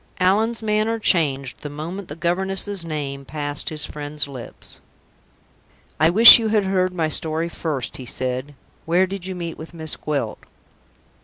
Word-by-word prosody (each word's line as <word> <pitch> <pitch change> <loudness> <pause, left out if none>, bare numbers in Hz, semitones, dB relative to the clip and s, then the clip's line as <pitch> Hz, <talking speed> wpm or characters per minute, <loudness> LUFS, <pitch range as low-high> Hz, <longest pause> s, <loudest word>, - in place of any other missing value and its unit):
Allan's 220 +5 +1
manner 215 +1 0
changed 140 - +1
the 150 - -6
moment 170 +6 -7
the 145 - -8
governess's 190 +3 -2
name 145 -4 -5
passed 145 +1 -2
his 155 -1 0
friend's 150 0 -3
lips. 130 -4 -9 1.2
"I 155 +2 +5
wish 225 +7 +10
you 225 - -1
had 215 -1 +2
heard 185 -1 0
my 170 -3 -1
story 160 +1 +1
first," 150 -7 -4
he 130 - -9
said. 130 +3 -4 0.3
"Where 175 +3 +3
did 190 -1 -6
you 190 - -5
meet 170 -2 -6
with 160 +2 -10
Miss 160 -2 -2
Gwilt?" 150 -2 -3
165 Hz, 155 wpm, -21 LUFS, 145-190 Hz, 1.2 s, wish